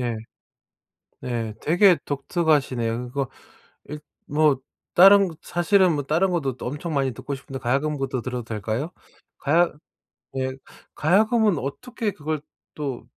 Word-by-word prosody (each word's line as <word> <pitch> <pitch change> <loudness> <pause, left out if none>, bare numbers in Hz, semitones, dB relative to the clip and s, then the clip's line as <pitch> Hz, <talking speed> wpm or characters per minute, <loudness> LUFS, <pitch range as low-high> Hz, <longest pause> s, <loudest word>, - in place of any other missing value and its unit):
네. 120 -2 -1 1.0
네. 115 -3 -3
되게 175 +3 +5
독특하시네요. 135 -6 0
그거 135 +1 -2 0.6
일 150 +1 -6 0.3
뭐 150 -2 +3 0.4
다른 195 +2 +8
거 165 - -10
사실은 180 +1 +3
뭐 145 -1 -2
다른 165 +7 +2
것도 140 -8 -1
또 - - -7
엄청 150 +5 -4
많이 135 -2 +1
듣고 140 +5 -5
싶은데 135 0 -7
가야금부터 135 0 -1
들어도 125 0 -4
될까요? 110 - -3 0.5
가야 170 +4 +3 0.7
예. 130 0 -1 0.4
가야금은 210 - +3
어떻게 215 - -3
그걸 155 -3 -4 0.3
또 135 -6 -4
145 Hz, 270 characters per minute, -24 LUFS, 130-175 Hz, 1.0 s, 다른